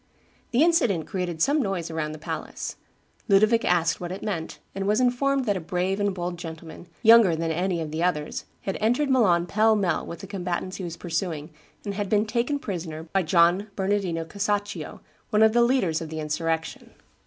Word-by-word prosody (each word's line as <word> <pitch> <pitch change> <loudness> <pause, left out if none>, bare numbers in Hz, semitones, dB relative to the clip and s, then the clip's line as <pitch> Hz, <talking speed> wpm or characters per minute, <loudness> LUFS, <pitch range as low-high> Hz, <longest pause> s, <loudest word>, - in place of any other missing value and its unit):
The 250 +5 +3
incident 235 - +2
created 175 -4 -2
some 295 +2 +3
noise 190 -7 -2
around 155 -1 -3
the - - -7
palace; - - -5 0.5
Ludovic 215 +3 +4
asked 170 -1 +1
what 175 0 -4
it 190 - -6
meant, 170 -7 -4 0.2
and 195 0 -3
was 210 +3 +3
informed 260 +2 +2
that 205 -3 +1
a - - -2
brave 180 +3 -1
and 205 0 +1
bold 175 -2 -4
gentleman, 165 0 -9 0.2
younger 225 -6 +7
than 165 0 -1
any 175 +2 0
of 155 -2 -5
the 160 +1 -3
others, 155 -4 -1 0.2
had 195 - -3
entered 245 +6 +2
Milan 185 -10 +4
pell 215 +4 +3
mell 190 -6 0
with 170 - -8
the - - -7
combatants 185 -1 -4
he 190 - -6
was 170 -1 -5
pursuing, 165 -3 -3 0.3
and 200 - -3
had 205 -1 -3
been 210 +1 +3
taken 240 +6 0
prisoner 165 - -5
by 195 - +3
John 175 +4 +3
Bernardino 190 -4 -1
Casaccio, 205 +3 -3 0.3
one 215 -1 +4
of 220 0 +5
the 240 - +4
leaders 235 -11 +2
of 160 - -6
the 160 0 -5
insurrection. 160 +1 -3
185 Hz, 190 wpm, -25 LUFS, 165-215 Hz, 0.5 s, younger